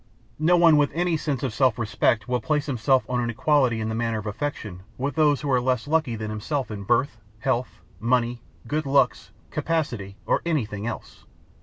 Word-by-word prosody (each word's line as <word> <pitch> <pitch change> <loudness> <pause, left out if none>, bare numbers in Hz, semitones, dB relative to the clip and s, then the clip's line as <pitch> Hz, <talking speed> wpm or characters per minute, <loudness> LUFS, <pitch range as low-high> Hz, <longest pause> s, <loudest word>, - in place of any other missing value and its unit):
No 170 +3 +4
one 165 -3 +6
with 145 -1 +3
any 175 0 +1
sense 145 -3 -2
of 130 -5 -1
self 130 -2 +2
respect 110 0 +1
will 125 -1 0
place 150 +4 0
himself 130 -1 +1
on 125 -1 -1
an 120 - -1
equality 125 -1 +2
in 110 - -2
the 110 - -2
matter 115 0 -1
of 105 - -6
affection 105 -5 -4 0.2
with 140 +2 -2
those 150 -2 +3
who 145 -2 -2
are 125 -1 +3
less 125 0 0
lucky 155 -6 +1
than 110 -1 -4
himself 125 +5 -3
in 105 -2 -5
birth, 120 +4 +1 0.2
health, 125 +1 -2 0.2
money, 120 0 +1 0.2
good 155 0 -2
looks, 135 -4 +2 0.2
capacity, 120 -12 -2
or - - +1
anything 115 -10 -2
else. 120 - -7
125 Hz, 190 wpm, -25 LUFS, 115-145 Hz, 0.2 s, one